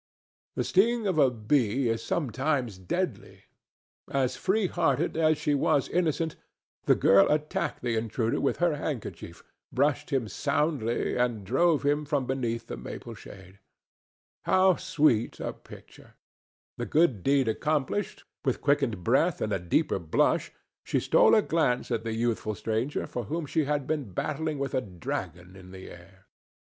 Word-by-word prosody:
The - - 0
sting 230 +4 +2
of 185 -5 +1
a 135 -3 +6
bee 120 +1 +1
is 115 0 -1
sometimes 130 - -1
deadly. 90 - -4 0.7
As 130 -2 0
free 200 +2 +1
hearted 165 -4 0
as 155 -1 +3
she 150 - 0
was 140 -1 +2
innocent, 165 -2 0 0.5
the - - +5
girl 100 0 +5
attacked 150 -3 -1
the 120 -2 0
intruder 115 +1 -1
with - - 0
her 170 -4 +1
handkerchief, 145 -6 -6 0.3
brushed 145 +2 +1
him 135 -6 0
soundly 140 - -1
and 120 -5 0
drove 150 - +2
him 145 +1 +1
from 145 -3 0
beneath 120 -3 -2
the - - -7
maple - - -8
shade. 95 0 -13 0.9
How 185 -1 +4
sweet 155 -12 +1
a - - -3
picture! - - -15 0.6
This - - -4
good 150 - +3
deed 135 +3 +2
accomplished, 150 - -1 0.2
with 130 -3 0
quickened 135 -9 0
breath - - +2
and - - -1
a - - 0
deeper 90 - 0
blush 80 -3 +1 0.3
she - - 0
stole - - +5
a 215 - +4
glance 130 -7 0
at 115 -2 -1
the 115 -1 -3
youthful 115 -2 -1
stranger 115 +7 -2
for 120 - -5
whom 160 +8 -3
she 150 +1 0
had 145 -1 -1
been 140 -10 -3
battling 155 - -2
with 140 -1 -3
a 130 - +1
dragon 90 -2 -6
in 95 -1 -13
the 95 0 -10
air. 95 +2 -16
135 Hz, 155 wpm, -28 LUFS, 110-155 Hz, 0.9 s, a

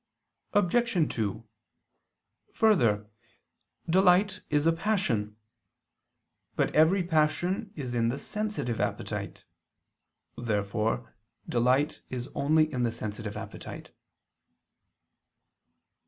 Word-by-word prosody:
Obj. 205 -3 +2
2: 110 0 -3 1.1
Further, 115 - +3 0.8
delight 185 +3 +4
is 145 +1 +2
a 165 - +5
passion. 160 - -1 1.2
But - - +1
every 170 +5 +4
passion 175 +5 0
is 130 -5 -5
in 115 -1 +2
the 130 - -2
sensitive 210 - -3
appetite. - - -4 0.9
Therefore 110 +1 -1 0.3
delight 130 +5 +1
is 125 0 -5
only 155 +2 +2
in 125 - -1
the 120 -1 +1
sensitive 105 -2 -5
appetite. - - -8
145 Hz, 85 wpm, -28 LUFS, 115-180 Hz, 1.2 s, a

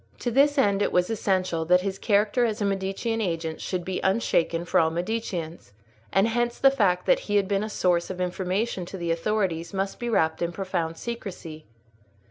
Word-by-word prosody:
To 245 - -2
this 285 +4 +4
end 200 -6 +3
it - - +1
was 180 +3 +2
essential 185 -6 0
that 180 +2 +4
his 195 0 -3
character 210 +3 +2
as 220 -3 0
a 205 - 0
Medicean 195 +4 -1
agent 165 -4 -3
should 180 -2 -3
be 185 -1 -3
unshaken 175 -4 +1
for - - +2
all 160 - +3
Mediceans, 175 - -4 0.4
and 195 +3 +3
hence 240 +1 0
the 270 - +5
fact 185 -8 +1
that - - +4
he 205 - +1
had 200 -2 +3
been 200 0 0
a 215 - -4
source 175 -4 +1
of 185 -1 -5
information 185 +3 -1
to 190 - -7
the 170 -2 -2
authorities 175 -1 -1
must 195 +1 -2
be 240 - -3
wrapped 160 -7 +1
in 170 0 0
profound 170 -4 -3
secrecy. 185 -9 -7
190 Hz, 195 wpm, -26 LUFS, 175-215 Hz, 0.4 s, the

